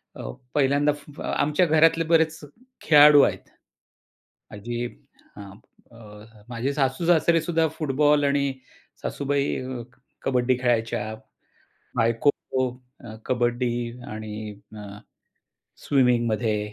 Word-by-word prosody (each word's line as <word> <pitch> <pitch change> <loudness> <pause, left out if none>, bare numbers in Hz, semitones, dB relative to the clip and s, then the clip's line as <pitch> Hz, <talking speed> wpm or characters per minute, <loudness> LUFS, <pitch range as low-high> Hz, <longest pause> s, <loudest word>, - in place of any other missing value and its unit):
अ, - - -9 0.3
पहिल्यांदा 145 +1 +3 0.4
आमच्या 150 +5 +2
घरातले 165 +1 +4
बरेच 160 -1 +2 0.4
खेळाडू 150 -1 +7
आहेत. - - -2 1.0
आजी 120 +3 -4 0.5
हां, 100 -2 -10 1.0
माझे 125 +3 -3
सासू-सासरे 165 +4 +2
सुद्धा 165 0 +1
फुटबॉल 150 0 +2
आणि 140 -1 +1 0.5
सासूबाई 140 0 -1 0.6
कबड्डी 125 -1 +1
खेळायच्या. 115 -3 -1 0.8
बायको 115 +4 +2
खो 130 -2 -3 0.4
अ, 110 -2 -9
कबड्डी 120 -1 0 0.3
आणि 110 0 -7 0.3
अ, 105 -1 -9 0.9
स्विमिंगमध्ये. 120 -5 +1
130 Hz, 85 wpm, -24 LUFS, 115-150 Hz, 1.0 s, खेळाडू